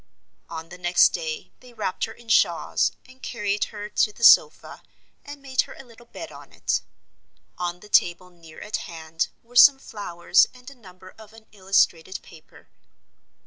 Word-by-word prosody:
On 165 Hz, 0 st, -8 dB
the 180 Hz, +1 st, -12 dB
next 175 Hz, 0 st, +4 dB
day 160 Hz, -3 st, -5 dB
they 250 Hz, -1 st, -17 dB
wrapped 210 Hz, -5 st, -3 dB
her 225 Hz, -, -10 dB
in 235 Hz, +1 st, -17 dB
shawls, 225 Hz, -, +2 dB
and 260 Hz, 0 st, -19 dB
carried 210 Hz, -3 st, -2 dB
her 205 Hz, -1 st, -8 dB
in 210 Hz, -, -10 dB
to 210 Hz, -, +3 dB
the 235 Hz, -, -12 dB
sofa, -, -, +5 dB, 0.4 s
and 285 Hz, -1 st, -11 dB
made 260 Hz, -2 st, +1 dB
her -, -, -9 dB
a -, -, -11 dB
little 240 Hz, -1 st, -18 dB
bed -, -, -9 dB
on -, -, -14 dB
it. -, -, -1 dB, 0.8 s
On 175 Hz, 0 st, -4 dB
the 210 Hz, -, -14 dB
table 180 Hz, -2 st, +1 dB
near 165 Hz, -2 st, -15 dB
at 210 Hz, -, -3 dB
hand 165 Hz, -2 st, -4 dB, 0.2 s
were 240 Hz, +1 st, -21 dB
some 275 Hz, +2 st, +8 dB
flowers 185 Hz, -7 st, +1 dB
and 250 Hz, +2 st, -13 dB
a -, -, -12 dB
number 185 Hz, -6 st, -16 dB
of 220 Hz, 0 st, -15 dB
an 225 Hz, -1 st, -17 dB
illustrated 190 Hz, -3 st, 0 dB
paper. 160 Hz, -2 st, -18 dB
205 Hz, 180 wpm, -24 LUFS, 175-235 Hz, 0.8 s, some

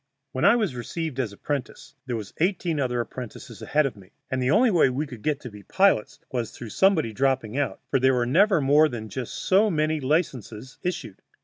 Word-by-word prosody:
When 130 Hz, +6 st, -1 dB
I 200 Hz, +4 st, +7 dB
was 215 Hz, -, 0 dB
received 135 Hz, +4 st, -5 dB
as 120 Hz, -6 st, -1 dB
apprentice 145 Hz, +6 st, -5 dB
there 125 Hz, -, -2 dB
were 110 Hz, -, -3 dB, 0.2 s
eighteen 170 Hz, -2 st, 0 dB
other 125 Hz, -3 st, 0 dB
apprentices 120 Hz, 0 st, -8 dB
ahead 150 Hz, +1 st, +2 dB
of 135 Hz, -, -3 dB
me, 95 Hz, -2 st, -16 dB, 0.2 s
and 130 Hz, -1 st, 0 dB
the 125 Hz, -, +1 dB
only 225 Hz, -, +4 dB
way 170 Hz, -7 st, +4 dB
we 135 Hz, +4 st, -2 dB
could 125 Hz, -6 st, -10 dB
get 150 Hz, +1 st, 0 dB
to 125 Hz, -, -8 dB
be 105 Hz, 0 st, -11 dB
pilots 190 Hz, -, +2 dB
was 120 Hz, -3 st, -2 dB
through 120 Hz, -, -9 dB
somebody 170 Hz, -, +2 dB
dropping 130 Hz, -2 st, 0 dB
out, 140 Hz, -1 st, -1 dB
for 135 Hz, -, +3 dB
there 130 Hz, +1 st, +3 dB
were 120 Hz, -1 st, +1 dB
never 190 Hz, -, +4 dB
more 145 Hz, +3 st, +5 dB
than 110 Hz, -3 st, -6 dB
just 130 Hz, 0 st, -5 dB
so 200 Hz, +3 st, +3 dB
many 155 Hz, -2 st, 0 dB
licenses 130 Hz, -, -2 dB
issued. 175 Hz, -, -4 dB
135 Hz, 210 wpm, -25 LUFS, 120-160 Hz, 0.2 s, I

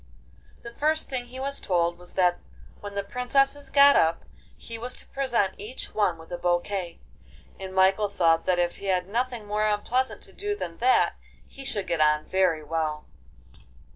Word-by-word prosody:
The 235 Hz, -, -9 dB
first 310 Hz, +4 st, 0 dB
thing 250 Hz, -2 st, -3 dB
he 255 Hz, +2 st, -9 dB
was 275 Hz, +1 st, -2 dB
told 175 Hz, -1 st, 0 dB
was 180 Hz, 0 st, -12 dB
that 180 Hz, -2 st, +2 dB, 0.4 s
when 205 Hz, -1 st, -8 dB
the 200 Hz, -, -1 dB
princesses 275 Hz, +6 st, 0 dB
got 280 Hz, 0 st, +7 dB
up 165 Hz, +1 st, +2 dB, 0.3 s
he 230 Hz, -, -8 dB
was 245 Hz, +2 st, -4 dB
to -, -, -11 dB
present 240 Hz, -8 st, 0 dB
each 220 Hz, +6 st, -7 dB
one 195 Hz, -6 st, +1 dB
with 160 Hz, +1 st, -14 dB
a 175 Hz, -, -4 dB
bouquet, 175 Hz, 0 st, -1 dB, 0.6 s
and 190 Hz, -1 st, -6 dB
Michael 190 Hz, +2 st, +3 dB
thought 165 Hz, -4 st, +2 dB
that 180 Hz, -1 st, +3 dB
if 175 Hz, 0 st, 0 dB
he 200 Hz, -, -7 dB
had 180 Hz, -1 st, +1 dB
nothing 240 Hz, +1 st, -2 dB
more 210 Hz, +1 st, 0 dB
unpleasant 240 Hz, +5 st, 0 dB
to -, -, -11 dB
do 410 Hz, 0 st, -3 dB
than 170 Hz, -, -6 dB
that 255 Hz, +2 st, +3 dB, 0.3 s
he 275 Hz, -, -11 dB
should 205 Hz, -7 st, -2 dB
get 170 Hz, -3 st, -1 dB
on 150 Hz, 0 st, +3 dB
very 180 Hz, -5 st, +1 dB
well. 155 Hz, -1 st, -2 dB
200 Hz, 180 wpm, -26 LUFS, 175-250 Hz, 0.6 s, got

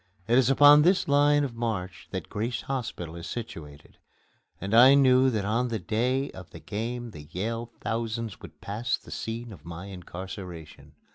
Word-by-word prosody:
It 120 Hz, -, +3 dB
is 130 Hz, -1 st, +3 dB
upon 145 Hz, +2 st, +8 dB
this 180 Hz, +3 st, +3 dB
line 145 Hz, 0 st, +4 dB
of 135 Hz, -4 st, -3 dB
march 100 Hz, -6 st, -4 dB
that 95 Hz, -4 st, -5 dB
Grace 115 Hz, +4 st, -3 dB
Hospital 115 Hz, -11 st, -4 dB
is 85 Hz, -1 st, -7 dB
situated, 80 Hz, -11 st, -8 dB, 0.6 s
and 100 Hz, +3 st, -4 dB
I 130 Hz, +4 st, +8 dB
knew 130 Hz, -1 st, +5 dB
that 110 Hz, -5 st, -1 dB
on 115 Hz, +4 st, +1 dB
the 115 Hz, -2 st, -2 dB
day 125 Hz, +7 st, -1 dB
of 95 Hz, -1 st, -11 dB
the -, -, -11 dB
game 115 Hz, +3 st, -4 dB
the 75 Hz, -4 st, -11 dB
Yale 115 Hz, +6 st, -3 dB
thousands 115 Hz, -1 st, -3 dB
would -, -, -13 dB
pass 115 Hz, +5 st, -2 dB
the -, -, -15 dB
scene 115 Hz, 0 st, -5 dB
of 80 Hz, -6 st, -14 dB
my 85 Hz, +2 st, -8 dB
incarceration. 90 Hz, -3 st, -9 dB
115 Hz, 170 wpm, -27 LUFS, 95-125 Hz, 0.6 s, upon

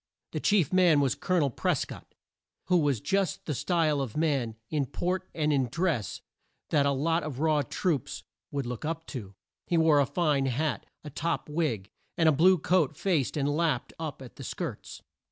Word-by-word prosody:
The -, -, -2 dB
chief 190 Hz, -7 st, +2 dB
man 180 Hz, -5 st, +5 dB
was 135 Hz, -4 st, +2 dB
Col 185 Hz, -, -1 dB
o -, -, +4 dB
nel 140 Hz, -, +2 dB
Pres -, -, 0 dB
cott, -, -, -12 dB, 0.5 s
who 180 Hz, -, +5 dB
was 145 Hz, -6 st, +1 dB
just 195 Hz, -, -1 dB
the 150 Hz, -, -2 dB
style 155 Hz, -1 st, +1 dB
of 135 Hz, 0 st, -4 dB
man, 140 Hz, -8 st, 0 dB, 0.2 s
in 145 Hz, -4 st, 0 dB
port 185 Hz, +5 st, -2 dB
and 150 Hz, -2 st, +1 dB
in 135 Hz, -3 st, +2 dB
dress, 160 Hz, -, -1 dB, 0.5 s
that 145 Hz, -3 st, +3 dB
a -, -, +3 dB
lot 165 Hz, +5 st, +1 dB
of 145 Hz, -4 st, -5 dB
raw 155 Hz, -1 st, +3 dB
troops 145 Hz, +1 st, -2 dB, 0.3 s
would 140 Hz, -2 st, -3 dB
look 120 Hz, -1 st, -5 dB
up 165 Hz, +1 st, -3 dB
to. 100 Hz, -7 st, -7 dB, 0.3 s
He 170 Hz, -, +2 dB
wore 160 Hz, -2 st, +5 dB
a 140 Hz, -, +3 dB
fine 150 Hz, -5 st, +1 dB
hat, 145 Hz, +5 st, -1 dB, 0.2 s
a 150 Hz, -, -8 dB
top 165 Hz, +4 st, -2 dB
wig, 140 Hz, -, -1 dB, 0.3 s
and 165 Hz, -2 st, +4 dB
a -, -, +7 dB
blue 180 Hz, +6 st, +5 dB
coat 160 Hz, -3 st, +1 dB
faced 160 Hz, -8 st, 0 dB
and 140 Hz, -1 st, +1 dB
lapped 150 Hz, -3 st, 0 dB
up 155 Hz, -4 st, -5 dB
at 125 Hz, -, -13 dB
the -, -, -8 dB
skirts. -, -, -6 dB
150 Hz, 195 wpm, -28 LUFS, 135-165 Hz, 0.5 s, a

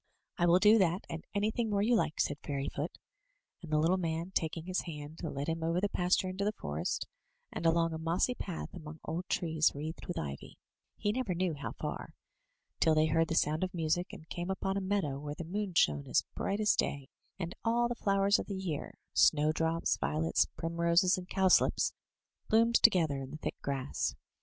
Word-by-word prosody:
'* -, -, -53 dB
"I 175 Hz, -, +4 dB
will 170 Hz, +1 st, +6 dB
do 210 Hz, +4 st, +6 dB
that, 180 Hz, -1 st, +1 dB
and 165 Hz, 0 st, -5 dB
anything 215 Hz, +3 st, 0 dB
more 200 Hz, -1 st, +1 dB
you 235 Hz, +3 st, +3 dB
like,*' 160 Hz, -7 st, 0 dB
said 145 Hz, +1 st, 0 dB
Fairy 140 Hz, -2 st, -2 dB
foot; 150 Hz, +4 st, -4 dB, 0.6 s
and 165 Hz, -3 st, -9 dB
the 155 Hz, -, +3 dB
little 170 Hz, +5 st, +3 dB
man, 165 Hz, +1 st, -2 dB
taking 160 Hz, -1 st, -2 dB
his 185 Hz, 0 st, -1 dB
hand, 150 Hz, -1 st, -7 dB
led 145 Hz, -4 st, -3 dB
him 165 Hz, 0 st, -2 dB
over 165 Hz, +2 st, +1 dB
the 205 Hz, +2 st, 0 dB
pas 180 Hz, 0 st, +2 dB
ture 185 Hz, -1 st, -1 dB
into 190 Hz, +2 st, -3 dB
the 210 Hz, -, +1 dB
forest, 75 Hz, -, -3 dB, 0.5 s
and 165 Hz, -, -1 dB
along 165 Hz, 0 st, +2 dB
a 160 Hz, -, -4 dB
mossy 170 Hz, +9 st, +1 dB
path 180 Hz, -8 st, -6 dB
among 155 Hz, -2 st, -9 dB
old 170 Hz, +3 st, -4 dB
trees 160 Hz, -2 st, +2 dB
wreathed 155 Hz, +3 st, -6 dB
with 175 Hz, -, -4 dB
ivy 70 Hz, -2 st, -6 dB, 0.4 s
(he 205 Hz, -, 0 dB
never 225 Hz, -6 st, -1 dB
knew 180 Hz, -1 st, 0 dB
how 145 Hz, -, -5 dB
far), -, -, -6 dB, 0.6 s
till 160 Hz, -1 st, +4 dB
they 155 Hz, 0 st, +4 dB
heard 165 Hz, +1 st, +2 dB
the 165 Hz, -, -2 dB
sound 155 Hz, +2 st, +2 dB
of 185 Hz, 0 st, -3 dB
music, 165 Hz, +2 st, 0 dB
and 160 Hz, -, -11 dB
came 175 Hz, +2 st, -4 dB
upon 195 Hz, 0 st, -1 dB
a 200 Hz, -, 0 dB
meadow 190 Hz, -8 st, -1 dB
where 145 Hz, 0 st, -5 dB
the 170 Hz, -, -5 dB
moon 190 Hz, +2 st, -3 dB
shone 75 Hz, -, +3 dB
as -, -, +2 dB
bright 200 Hz, +1 st, -2 dB
as 215 Hz, -1 st, +3 dB
day, 140 Hz, -2 st, -1 dB, 0.3 s
and 175 Hz, -2 st, -4 dB
all 235 Hz, +1 st, +2 dB
the 240 Hz, -, -2 dB
flowers 200 Hz, -2 st, +2 dB
of -, -, -5 dB
the 200 Hz, -, -4 dB
year 175 Hz, -6 st, -4 dB
— -, -, -59 dB
snowdrops, 160 Hz, +2 st, +3 dB
violets, 160 Hz, +2 st, +1 dB
primroses, 170 Hz, +3 st, +2 dB
and 185 Hz, -1 st, -7 dB
cowslips 190 Hz, -1 st, +3 dB, 0.3 s
— -, -, -46 dB
^bloomed 230 Hz, +1 st, +4 dB
together 160 Hz, -10 st, +4 dB
in 130 Hz, -, -7 dB
the 155 Hz, -, -7 dB
thick -, -, -5 dB
grass. 140 Hz, -1 st, -2 dB
170 Hz, 210 wpm, -32 LUFS, 155-190 Hz, 0.6 s, will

